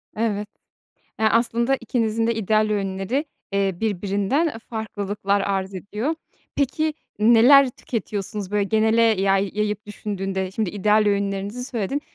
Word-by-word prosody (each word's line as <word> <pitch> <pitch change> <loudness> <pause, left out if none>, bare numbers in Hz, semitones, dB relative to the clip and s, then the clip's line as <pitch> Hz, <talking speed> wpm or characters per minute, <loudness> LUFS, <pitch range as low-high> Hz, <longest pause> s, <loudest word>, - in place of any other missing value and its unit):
Evet. 210 -2 -1 0.7
Ya, 220 0 +3
aslında 235 +3 +2
ikinizin 225 -2 0
de 230 - +1
ideal 215 0 +1
öğünleri, 200 +6 -1 0.3
eee, 195 -1 +1
birbirinden, 205 - 0
e, 255 - -6
farklılıklar 205 -3 -2
arz 195 -1 -2
ediyor. 210 - -3 0.4
Peki, 305 +3 0 0.2
neler 240 +5 +7
tüketiyorsunuz, 210 -5 -5
böyle, 205 -1 +1
genele 220 +2 +3
yay 195 -3 +2
yayıp 210 0 -2
düşündüğünde? 195 -2 -3
Şimdi 205 -1 -2
ideal 210 +2 +3
öğünlerinizi 200 +3 -1
söyledin. 250 +2 -2
210 Hz, 125 wpm, -23 LUFS, 200-230 Hz, 0.7 s, neler